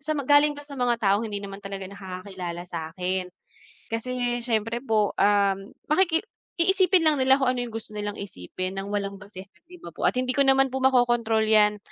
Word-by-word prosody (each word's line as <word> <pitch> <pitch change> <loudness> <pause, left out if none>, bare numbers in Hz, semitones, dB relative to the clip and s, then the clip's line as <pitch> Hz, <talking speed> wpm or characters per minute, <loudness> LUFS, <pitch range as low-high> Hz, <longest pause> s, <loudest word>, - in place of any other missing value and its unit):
sa 305 +2 -2
galing 290 +2 +4
daw, 290 - -9
sa 290 - -12
mga 245 -1 +2
taong 215 0 +1
hindi 205 -1 -5
naman 195 0 -8
talaga 195 -1 -6
nakakakilala 185 -2 -7
sa'kin. 180 +2 -3 0.6
Kasi, 245 +1 -2
siyempre 230 0 -1
po, 215 -5 +1
um, 200 -1 +2 0.2
makiki 325 +1 +3 0.4
iisipin 370 -1 +3
lang 295 -4 +3
nila 265 +1 +5
kung 255 -2 +1
ano, 245 - -2
yung 240 - -5
gusto 220 -1 -8
nilang 205 0 -4
isipin 185 - -6
ng 195 +1 -5
walang 200 -1 -2
basehan, 195 -2 -11 0.2
'di 360 - -12
ba 345 - -11
po? - - -9
At - - -1
hindi 255 0 -1
ko 280 - +4
naman 270 -1 +3
po 265 - -2
makokontrol 240 -4 +3
'yan. 210 -1 +4
220 Hz, 190 wpm, -25 LUFS, 200-265 Hz, 0.6 s, nila